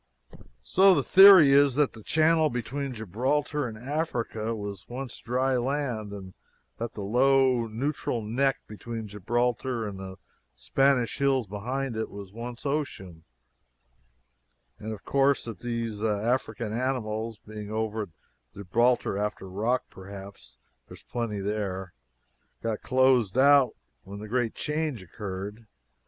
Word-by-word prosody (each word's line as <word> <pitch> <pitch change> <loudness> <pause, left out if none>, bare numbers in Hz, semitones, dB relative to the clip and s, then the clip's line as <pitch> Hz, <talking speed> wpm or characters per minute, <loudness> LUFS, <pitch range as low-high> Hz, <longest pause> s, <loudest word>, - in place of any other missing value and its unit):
So 190 - +5
the - - +1
theory 190 -7 +9
is 140 -2 +5
that 145 -1 +2
the 110 - -11
channel 160 +5 +3
between 130 +2 -4
Gibraltar 130 - -1
and 110 -2 -8
Africa 120 -4 -2
was 100 -1 -7
once 130 +1 -6
dry 130 +2 0
land, 125 -5 -2
and 95 -2 -8 0.5
that 115 0 -4
the 105 - -5
low, 130 +2 +3
neutral 120 0 -2
neck 130 +6 0
between 110 +1 -7
Gibraltar 120 +3 -1
and 100 -2 -7
the 95 -1 -8 0.4
Spanish 135 -3 +1
hills 135 -3 +2
behind 120 +6 -3
it 110 - -3
was 100 -1 -10
once 120 +3 -7
ocean, 95 - -3 1.5
and 110 - -5
of 110 - -8
course 140 0 +2
that 115 -2 -7
these 115 -3 -3
African 110 0 -1
animals, 115 -3 -2
being 105 -1 -9
over 110 0 -2
at 100 - -5 0.5
Gibraltar 105 +2 +1
(after 105 -2 -3
rock, 110 +7 0
perhaps 100 +1 -11 0.3
there - - -11
is - - -18
plenty 115 -4 -3
there), 95 -3 -3 0.7
got 115 -2 -2
closed 130 -4 +3
out 140 -1 +5 0.3
when 100 +1 -9
the 105 +1 -8
great 120 0 -1
change 150 -8 -2
occurred. 100 +3 -7
115 Hz, 135 wpm, -27 LUFS, 105-135 Hz, 1.5 s, theory